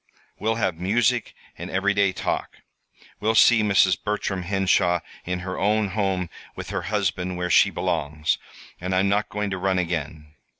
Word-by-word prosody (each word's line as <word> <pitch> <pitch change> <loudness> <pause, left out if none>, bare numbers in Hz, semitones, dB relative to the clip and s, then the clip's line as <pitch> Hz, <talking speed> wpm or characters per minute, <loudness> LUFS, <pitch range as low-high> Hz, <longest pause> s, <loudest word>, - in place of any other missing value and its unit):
We'll 110 +1 0
have 95 -7 -1
music 115 +5 +1 0.2
and - - -6
everyday 100 0 +2
talk. - - -3 0.6
We'll 110 +2 +1
see 115 +1 +6
Mrs. 100 -4 +3
Bertram 100 -2 -2
Henshaw 90 -2 +2 0.2
in 90 0 -3
her 95 0 -5
own 105 +1 +2
home 95 -3 -1 0.3
with - - -7
her - - -2
husband, 90 -3 -1
where 90 0 -2
she - - +6
belongs; 80 -3 -1 0.4
and 90 +1 -2
I'm 95 +1 +2
not 105 +1 +1
going 105 -1 -3
to 95 - -3
run 95 0 +1
again. 80 -3 -3
95 Hz, 160 wpm, -24 LUFS, 90-105 Hz, 0.6 s, see